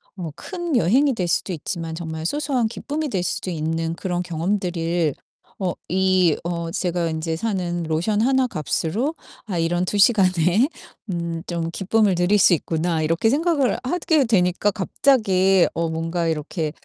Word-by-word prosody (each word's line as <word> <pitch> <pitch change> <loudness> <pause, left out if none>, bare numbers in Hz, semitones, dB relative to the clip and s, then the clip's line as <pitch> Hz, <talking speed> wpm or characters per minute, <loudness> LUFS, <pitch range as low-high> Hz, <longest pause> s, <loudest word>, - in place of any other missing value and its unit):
뭐 170 -5 -5
큰 345 -5 -4
여행이 260 - +3
될 180 -4 -1
수도 185 - 0
있지만 165 0 -4
정말 160 -1 -5
소소한 280 -6 0
기쁨이 295 +6 -4
될 185 -5 -1
수도 185 - -3
있는 165 0 -2
그런 175 -1 -2
경험들을 170 -2 -1 0.5
어 185 -3 -1 0.2
이 185 -3 +3
어 170 -1 -3
제가 175 -2 -1
인제 160 0 -2
사는 175 -4 -2
'로션 170 +7 0
하나 260 +1 +3
값으로 215 - -2 0.3
아 185 -4 -2
이런 175 +2 +1
2 205 - -2
시간에 190 - +4 0.4
음 170 -1 -3
좀 170 -1 -2
기쁨을 200 +2 +2
누릴 180 +4 +3
수 185 - +6
있구나.' 165 0 0
이렇게 165 +8 +2
생각을 295 -3 +1
하게 315 -1 +1
되니까 190 -2 +2
갑자기 195 -3 +3
어 165 0 -1
뭔가 165 +1 -2
이렇게 155 0 -2
180 Hz, 295 characters per minute, -22 LUFS, 165-215 Hz, 0.5 s, 수